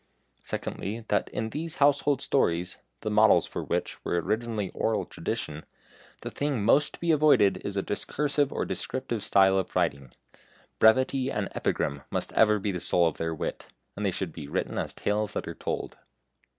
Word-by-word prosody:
Secondly, 110 +3 -4
that 105 - +1
in 110 0 -3
these 160 +4 -2
household 145 -1 +3
stories 90 -8 0 0.2
(the 110 - -2
models 110 +1 +5
for - - -5
which - - -3
were 85 - 0
originally 110 +2 -2
oral 110 -1 0
tradition) 75 +1 -4 0.6
the - - -5
thing 140 -8 -1
most 150 +6 +3
to - - -18
be 170 -1 +1
avoided 145 -10 +5
is 100 0 -4
a 100 - 0
discursive 145 +5 0
or - - -2
descriptive 125 -4 -3
style 95 -1 +4
of 95 - -5
writing. 70 -2 0 0.7
Brevity 130 +3 +4
and 105 -6 -2
epigram 70 -1 -1
must - - -3
ever 105 -1 +5
be 100 -2 -2
soul 85 0 +2
of 80 - -3
their 80 0 -2
wit, - - -5 0.3
and 105 - -4
they 100 - +2
should 90 -2 -3
be 75 -4 -8
written - - -2
as - - -4
tales 105 0 -1
that - - -3
are - - -4
told. - - -4
105 Hz, 175 wpm, -27 LUFS, 95-135 Hz, 0.7 s, models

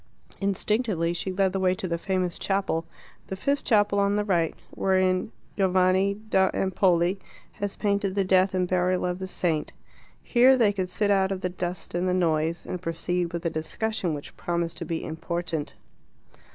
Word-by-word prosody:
Instinctively 200 -3 0
she 180 +2 -3
led 190 0 +1
the 195 - 0
way 185 -1 +2
to 185 - -4
the 170 -1 -2
famous 185 -1 -1
chapel, 195 -4 -1 0.4
the 190 - -4
fifth 280 +8 0
chapel 205 -3 +3
on 200 0 +2
the 210 - +1
right, 170 -5 +1 0.2
wherein 185 +2 +1 0.2
Giovanni 190 0 +3
da 200 -3 +1
Empoli 185 -1 +2 0.3
has 205 -1 -4
painted 200 -2 0
the 200 - +2
death 190 0 +3
and 180 -1 +1
burial 180 0 +1
of 180 0 -2
the 190 - -4
saint. 165 -5 -1 0.5
Here 255 +2 +5
they 215 -4 +4
could 185 -2 -2
sit 205 +3 0
out 195 -1 +3
of 190 -1 -3
the 180 - -1
dust 180 0 -5
and 175 +1 0
the 180 - +1
noise, 165 -1 0
and 180 - -5
proceed 175 0 -2
with 170 -1 -5
a 170 - +1
discussion 175 +2 -2
which 145 - -9
promised 170 -1 -2
to 170 - -4
be 165 0 -3
important. 160 -1 -4
185 Hz, 180 wpm, -26 LUFS, 175-200 Hz, 0.5 s, Here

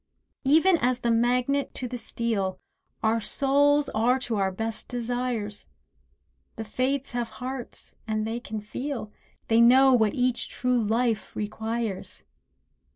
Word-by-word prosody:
Even 325 +5 +5
as 250 0 +1
the 235 - +1
magnet 250 +4 +1
to 255 - -3
the 245 0 -5
steel 215 -6 -2 0.4
Our 225 +1 +2
souls 285 +4 +3
are 235 +4 +2
to 235 -3 -2
our 195 -1 +1
best 225 +3 -3
desires; 240 -3 -3 0.9
The 225 - -5
Fates 255 +5 -1
have 240 -1 -2
hearts 255 0 -5
and 215 -1 -1
they 225 +2 -3
can 220 -3 -6
feel— 235 +1 -5 0.4
They 225 +1 +4
know 260 +3 +7
what 220 -4 +3
each 250 -1 0
true 250 -1 0
life 225 +1 0
requires. 220 -1 -4
240 Hz, 135 wpm, -26 LUFS, 220-255 Hz, 0.9 s, know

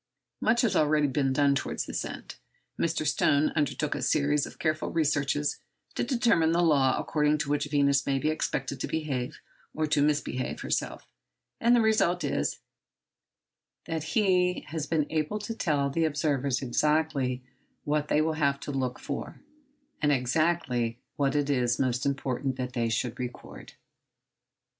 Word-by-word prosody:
Much 235 +2 +3
has 235 - +1
already 150 0 +3
been 135 0 +1
done 140 +1 +3
towards 140 - -2
this - - -3
end. - - -7 0.5
Mr. 165 -2 0
Stone 145 0 +3
undertook 150 -1 0
a - - -4
series 145 -1 +2
of - - -12
careful 155 -1 -1
researches 145 -2 0 0.3
to - - -1
determine 230 - +2
the 175 +1 +3
law 140 -5 +3
according 150 0 +1
to 150 - -3
which 145 0 +1
Venus 140 -2 +2
may 135 -1 +2
be 155 +3 +1
expected 155 - -2
to - - -2
behave, 140 -6 -3 0.4
or 155 - 0
to 150 -1 +1
misbehave 145 -4 -1
herself; - - -2 0.5
and 240 +1 +4
the 235 - +4
result 215 -6 +2
is, - - -1 1.3
that 160 -1 -3
he 180 -3 +3
has 155 -1 -3
been 155 -3 +1
able 155 +6 -1
to 210 +2 -5
tell 150 -9 0
the 165 +3 +1
observers 140 -3 0
exactly 135 -1 0 0.4
what 150 0 0
they 150 - +3
will 160 +1 +1
have 140 -3 +1
to - - -5
look 130 -2 -2
for, - - -6 0.6
and 150 -1 +3
exactly 125 -3 +1 0.2
what 140 0 0
it 145 -1 +1
is 125 -4 +1
most 130 0 0
important 135 -1 -1
that 125 -1 -4
they 115 -2 0
should 115 +1 -2
record. 125 -1 -8
145 Hz, 155 wpm, -28 LUFS, 135-160 Hz, 1.3 s, and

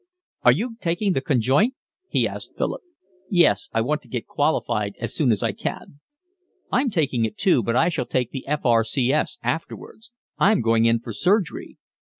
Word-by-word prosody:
"Are - - +6
you 230 0 -2
taking 180 +3 0
the 135 - 0
Conjoint?" 135 - +2 0.3
he - - +2
asked - - -8
Philip. - - -2 0.5
"Yes, 185 +2 +3
I 115 - +1
want 150 +6 -1
to - - -20
get 120 -3 -4
qualified 115 -9 -1
as 115 -2 -3
soon 135 -6 +2
as 105 - 0
I - - +1
can." 145 - -6 0.7
"I'm 255 +1 +2
taking 145 - 0
it 110 -1 -3
too, 180 -10 +3
but 115 +2 -1
I 165 +7 +4
shall 150 -8 -3
take 125 -2 -1
the 135 - -7
F. 150 +1 -2
R. 115 -2 +4
C. 125 +3 0
S. 155 - 0
afterwards. 220 +7 -5 0.3
I'm 210 +1 +4
going 115 0 +3
in 115 0 +3
for 115 - -7
surgery." 190 - 0
140 Hz, 185 wpm, -23 LUFS, 115-175 Hz, 0.7 s, Are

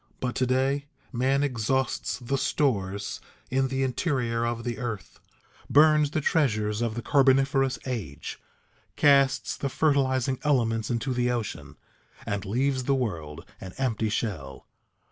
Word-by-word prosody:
But 125 -1 -2
to 130 - +1
day, 135 +3 +1 0.3
man 135 +3 +2
exhausts 130 0 -1
the 130 +1 -2
stores 100 -7 -1 0.3
in 135 +1 +2
the 135 0 -1
interior 125 -4 0
of 115 0 -3
the 120 -1 -3
earth, 115 -6 -5 0.5
burns 150 0 +5
the 155 +1 -1
treasures 110 -9 +1
of 115 -2 -1
the 120 - -4
carboniferous 135 -1 +3
age, 110 - -5 0.6
casts 140 -2 +3
the 140 - -3
fertilizing 130 -2 +1
elements 115 -7 +1
into 120 +2 -1
the 125 0 +1
ocean, 120 -3 -4 0.5
and 100 0 -3
leaves 130 +5 0
the 140 - +2
world 85 - -4
an 95 -1 -9
empty 115 -5 0
shell. 90 - -4
125 Hz, 135 wpm, -27 LUFS, 110-135 Hz, 0.6 s, burns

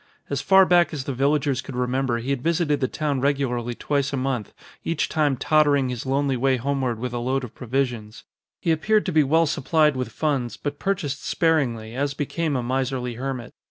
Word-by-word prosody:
As - - -1
far 190 -1 +6
back 175 -3 +3
as 140 - -3
the 135 - -3
villagers 140 0 +1
could 130 0 -8
remember 125 0 0
he 120 +4 -3
had 135 -3 -1
visited 165 -1 +1
the 130 - +1
town 145 -2 -2
regularly 125 -4 0
twice 140 0 -1
a 140 - -2
month, 130 -5 -2 0.3
each 165 -2 0
time 145 -4 +1
tottering 145 -2 +3
his 125 +1 -5
lonely 135 0 +1
way 130 +1 +2
homeward 130 -2 -1
with 125 +1 -4
a 120 - -2
load 130 +2 -1
of 120 - -7
provisions. 120 -4 -3 0.4
He 170 - 0
appeared 210 +7 +2
to 185 - -1
be 155 -2 +4
well 160 +4 +3
supplied 150 0 +2
with 130 -1 -3
funds, 135 -6 -1
but 145 0 -5
purchased 145 -8 -2
sparingly 125 -9 0
as 140 +1 -1
became 150 +1 -2
a 125 - -1
miserly 130 0 -1
hermit. 130 0 -5
135 Hz, 195 wpm, -24 LUFS, 125-150 Hz, 0.4 s, far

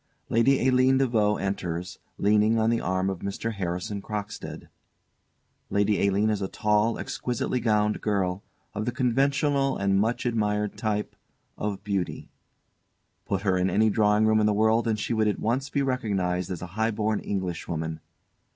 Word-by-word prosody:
_ - - -46 0.3
LADY 130 +3 +3
ALINE 130 +1 +4
DE 135 - +3
VAUX 105 -4 +1
enters, 90 -3 -3 0.2
leaning 105 +2 +3
on 110 +1 +2
the 115 - +1
arm 95 +1 0
of 95 -2 -2
MR. 100 +4 -3
HARRISON 100 +2 -3
CROCKSTEAD. 105 0 -6 1.0
LADY 100 0 +2
ALINE 100 +2 +2
_is 105 -2 -1
a 95 - -1
tall, 105 +3 +1
exquisitely 125 +1 -2
gowned 105 -2 +1
girl, 95 -3 0 0.3
of 105 +1 -3
the 125 - 0
conventional 135 +3 +1
and 100 0 +2
much 115 +5 0
admired 105 -3 0
type 105 -2 -2 0.4
of 100 -2 -4
beauty. 100 -4 -3 1.0
Put 95 -1 -1
her 95 -3 +2
in 90 +1 +2
any 110 +4 +3
drawing 105 0 +3
room 110 0 +4
in 105 - +3
the 105 - +3
world, 110 +2 +3
and 110 -1 +1
she 105 - -2
would 110 -1 +2
at 105 - 0
once 130 +5 -1
be 140 - 0
recognised 95 -9 -1
as 90 -2 -5
a - - -5
highborn 110 0 0
Englishwoman. 85 -4 -3
105 Hz, 165 wpm, -26 LUFS, 100-115 Hz, 1.0 s, ALINE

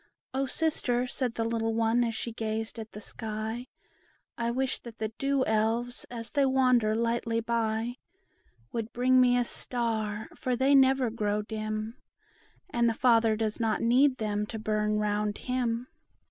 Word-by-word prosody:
"O 270 +1 0
sister," 255 -6 +1
said 250 -1 -2
the 225 - 0
little 225 0 -1
one, 230 +1 +3
as 230 -1 -1
she 230 +1 -3
gazed 220 0 -3
at 220 0 -8
the 210 - -7
sky, 220 +3 -5 0.7
"I 235 0 -1
wish 260 +2 -1
that 235 -1 -11
the 220 0 -2
Dew 275 -1 +1
Elves, 225 +3 0
as 230 -1 -6
they 285 - +2
wander 255 -5 +3
lightly 230 0 0
by, 230 +1 -1 0.7
Would 230 -1 -4
bring 255 +1 +4
me 245 -1 +4
a 245 - +3
star; 220 -3 -2
for 255 -1 -1
they 265 +3 +3
never 265 -3 +5
grow 210 -2 -1
dim, 215 +1 -4 0.7
And 235 -1 +3
the 225 - -1
Father 230 -2 +4
does 215 0 -2
not 225 -1 0
need 255 +3 +4
them 210 -1 -1
to 225 - -5
burn 215 0 0
round 210 0 0
him. 245 -2 -1
230 Hz, 160 wpm, -29 LUFS, 220-245 Hz, 0.7 s, never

